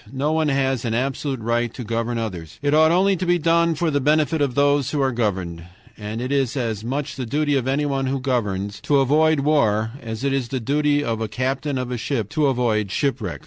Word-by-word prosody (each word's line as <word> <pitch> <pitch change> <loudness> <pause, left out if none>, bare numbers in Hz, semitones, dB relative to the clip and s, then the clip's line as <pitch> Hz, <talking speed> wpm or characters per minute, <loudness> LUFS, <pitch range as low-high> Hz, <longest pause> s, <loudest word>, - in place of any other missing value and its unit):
No 140 +3 -1
one 160 -1 +1
has 135 -3 0
an 115 -2 -1
absolute 135 +1 -2
right 120 +1 0
to 125 - -6
govern 115 +1 -2
others. 90 -9 -5
It 145 0 +2
ought 155 +1 +5
only 190 +3 +3
to 180 - -2
be 175 0 +4
done 170 0 +2
for 160 +1 0
the 145 -1 +1
benefit 155 +2 +2
of 135 -4 0
those 145 -1 +2
who 150 - -2
are 135 -1 +2
governed. 95 -8 -2 0.3
And 105 +1 -6
it 130 +2 -3
is 135 -2 0
as 110 -4 -2
much 135 +4 -3
the 130 - -3
duty 145 +3 +1
of 130 -2 0
anyone 135 -1 0
who 135 +1 -1
governs 105 -6 -2
to 145 - +2
avoid 150 +3 +3
war 110 -7 +2
as 110 0 -6
it 140 -1 +1
is 135 -3 -1
the 130 +2 -3
duty 145 +4 +1
of 115 -4 -2
a 110 - -1
captain 135 +4 -2
of 125 -1 -3
a 125 - -2
ship 115 -4 -2
to 150 +2 +1
avoid 115 -6 +1
shipwreck. 125 +3 -2
135 Hz, 225 wpm, -22 LUFS, 115-145 Hz, 0.3 s, ought